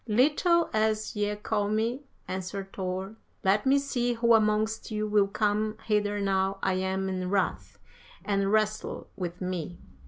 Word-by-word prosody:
"'Little 305 - +3
as 215 0 0
ye 210 0 0
call 210 0 -1
me,' 225 +5 0 0.3
answered 190 +1 -5
Thor, 190 +2 -4 0.3
'let 200 +6 +2
me 275 +1 +5
see 245 -3 0
who 235 0 +3
amongst 215 0 +2
you 215 -1 -1
will 205 -1 +3
come 215 +1 0
hither 205 -1 +1
now 195 0 +1
I 190 - +2
am 190 +1 -1
in 185 -1 -2
wrath, 195 -1 -1 0.5
and 200 -1 +1
wrestle 215 0 -1
with 180 -2 -5
me.' 175 -2 -3
210 Hz, 150 wpm, -28 LUFS, 190-220 Hz, 0.5 s, me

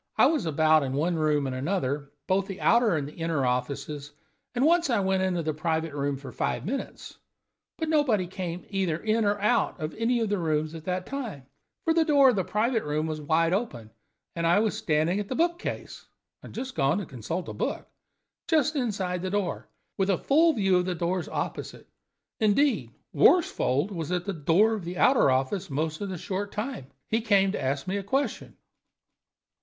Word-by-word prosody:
I - - +6
was 305 - +1
about 155 0 +4
in 135 -2 -2
one 160 +6 +1
room 150 -3 +1
and 130 -1 -3
another, 140 -2 -2
both 190 +1 +1
the 195 -2 -7
outer 230 -5 +4
and 145 -2 -2
the 150 - -10
inner 165 -5 -1
offices, 140 +3 -3 0.4
and 250 +3 +2
once 335 -1 +3
I 235 -4 +2
went 190 -1 +1
into 180 -3 0
the 155 0 -1
private 160 0 -2
room 140 -1 -1
for 135 0 -9
five - - -2
minutes, 265 +8 -5 0.6
but 320 - -2
nobody 285 - +2
came 180 -1 -5
either 190 -5 0
in 220 +4 0
or 205 0 +1
out 210 -1 +1
of 155 -1 -4
any 235 +2 +1
of 225 -2 0
the 205 -2 0
rooms 155 -1 -1
at 160 -1 -9
that 180 0 -2
time, 230 - -6 0.4
for 325 - +3
the 330 0 +4
door 285 -4 +5
of - - -2
the 190 - +1
private 225 +5 0
room 150 +1 -1
was 155 -1 -4
wide 165 +3 +2
open, 130 - -3 0.4
and 170 0 0
I 170 - +4
was 215 -1 +1
standing 160 +5 +1
at 205 - -4
the 255 - -3
book 340 +3 +1
case - - -6 0.3
(I - - -11
had 255 +2 -6
gone 140 +5 +2
to 205 - -3
consult 155 - -5
a - - -5
book), - - -3 0.6
just 310 -2 +2
inside 195 -9 -1
the 185 - -2
door, 195 -2 -2 0.3
with 195 0 +2
a 190 - +3
full 320 +4 +4
view 195 -7 +2
of 180 - +1
the 180 -1 -2
doors 175 +1 -2
opposite. - - -5 0.5
Indeed, 240 +7 +2 0.2
Worsfold 180 - +3
was 170 -3 -4
at 180 -1 -1
the 200 - -2
door 175 +8 +3
of 210 -4 -4
the 175 +1 -6
outer 255 - +5
office 135 +9 0
most 155 +4 -2
of 200 - -3
the 185 - -4
short 200 +4 -4
time. 215 - -4 0.2
He 225 +1 0
came 200 -3 +3
to 205 - -3
ask 135 +1 -1
me 190 +2 -2
a 200 - -4
question." 270 +8 -2
185 Hz, 205 wpm, -27 LUFS, 155-220 Hz, 0.6 s, I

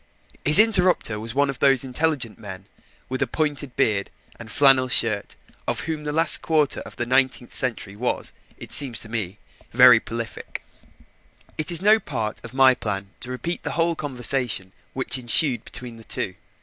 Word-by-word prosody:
His 150 +3 +10
interrupter 185 - +3
was 115 +3 -8
one 140 0 +2
of 135 - -12
those 135 -2 +3
intelligent 135 -3 -1
men 95 -3 -10 0.4
with 130 0 -5
a 135 - +1
pointed 145 -1 -3
beard 100 -3 0 0.3
and 115 -1 -11
a - - -10
flannel 135 -1 +4
shirt, 115 -5 +1 0.3
of - - -2
whom 155 -1 -5
the 150 - -3
last 160 +1 +3
quarter 155 -3 0
of - - -11
the 120 - -4
nineteenth 130 0 0
century 110 -5 -2
was, 120 +4 -3 0.2
it - - -11
seems 130 -6 +2
to 110 - 0
me, 105 -4 -5 0.4
very 125 -1 +7
prolific. 115 +2 -8 0.9
It 155 +2 -4
is 170 +1 +1
no 215 +2 +5
part 115 - -5
of - - -10
my 130 0 +4
plan 100 -4 -6
to 125 - -5
repeat 165 +7 -4
the - - -5
whole 170 0 0
conversation 125 -8 0 0.2
which 130 0 0
ensued 125 +2 +3
between 120 -2 -9
the 115 - -14
two. - - -5
130 Hz, 175 wpm, -22 LUFS, 115-150 Hz, 0.9 s, His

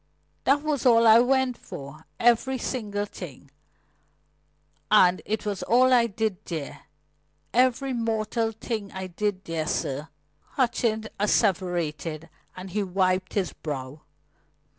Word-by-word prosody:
"That 285 +2 +3
was 300 -4 -1
all 230 -2 +5
I 225 0 +8
went 260 0 +2
for 140 +3 -10
every 240 +3 +3
single 210 -5 -3
thing. - - -10 1.4
And 185 -4 +5
it 215 +1 -2
was 205 -3 -2
all 255 +2 +4
I 235 -2 +5
did 215 -2 -2
there 155 -5 -6 0.7
every 255 +2 +2
mortal 225 -1 -1
thing 220 -2 -5
I 190 0 -5
did 190 +1 -3
there, 160 -2 -3
sir," 145 +4 -2 0.4
Hutchings 235 -4 0
asseverated, 170 -6 0 0.3
and 185 0 -8
he 210 +3 0
wiped 185 -1 0
his 195 -3 0
brow. 145 -1 -6
210 Hz, 120 wpm, -26 LUFS, 180-235 Hz, 1.4 s, I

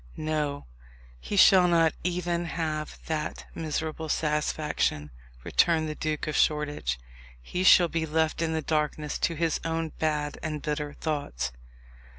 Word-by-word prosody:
"No; 150 -2 -2 0.5
he 205 - -4
shall 190 -2 +7
not 165 -2 +4
even 175 -1 -1
have 155 -2 -3
that 155 -1 -3
miserable 160 0 -3
satisfaction," 150 - 0 0.3
returned 165 -2 +2
the 155 - -3
Duke 155 0 -2
of 155 - -3
Shoreditch. 145 - +1 0.4
"He 180 - -3
shall 180 -2 +7
be 165 -1 -2
left 160 +1 0
in 165 -1 0
the 160 -1 -1
darkness 150 -1 -1
to 165 - 0
his 165 0 0
own 165 0 -1
bad 150 -2 -1
and 155 -1 -3
bitter 150 -1 -3
thoughts." 70 - -3
155 Hz, 140 wpm, -27 LUFS, 150-165 Hz, 0.5 s, shall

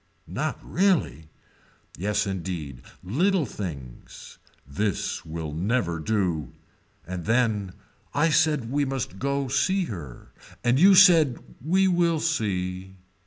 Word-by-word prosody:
Not - - -3
really. 170 - 0 0.7
Yes 105 +3 -1
indeed. 85 -8 -5 0.2
Little 165 - +1
things. 70 - -9 0.3
This 95 - -2
will 80 -1 -5
never 90 -1 -1
do. 90 -4 -1 0.5
And 90 -2 -6
then. 110 -5 +1 0.4
I 155 +3 +2
said 150 -7 +2
we 145 +1 +1
must 130 -9 -4
go 140 0 -1
to 130 - -5
see 185 +7 +2
her. 80 - -9 0.3
And 120 +2 +3
you 195 +3 +7
said 165 -9 +6 0.3
we 190 +5 +3
will 170 -3 +2
see. 95 - -2
110 Hz, 120 wpm, -25 LUFS, -, 0.7 s, you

